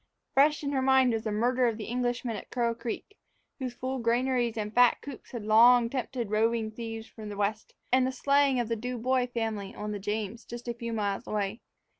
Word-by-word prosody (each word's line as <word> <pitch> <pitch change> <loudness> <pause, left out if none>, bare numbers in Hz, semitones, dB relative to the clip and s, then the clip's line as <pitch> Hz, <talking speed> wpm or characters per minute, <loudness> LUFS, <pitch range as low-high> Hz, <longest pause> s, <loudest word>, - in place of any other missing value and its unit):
Fresh 300 +3 +4
in 280 - -1
her 270 -2 +1
mind 260 -2 +4
was 225 0 -2
the 215 - -1
murder 245 +4 +2
of 225 -2 -1
the 220 - -5
Englishman 245 0 -2
at 205 - -8
Crow 235 -2 0
Creek, 240 - -6 0.4
whose 255 -2 -4
full 260 +1 -3
granaries 240 0 +1
and 210 0 -3
fat 245 -1 +5
coops 280 -4 -10
had 235 -4 -6
long 230 +2 +6
tempted 245 -4 -3
roving 220 0 +1
thieves 225 0 -6
from 215 -2 -10
the 205 - -7
west; 210 +1 -2 0.2
and 255 0 +4
the - - -1
slaying 275 0 +3
of 240 - 0
the 230 - -1
Du 250 +3 -4
Bois 250 +1 +1
family 220 -4 -3
on 210 0 -4
the 205 - -4
James, 210 +2 -3
just 240 +1 -9
a 240 - -1
few 235 0 -5
miles 205 -3 -2
away. 210 +2 -2
235 Hz, 215 wpm, -29 LUFS, 220-250 Hz, 0.4 s, long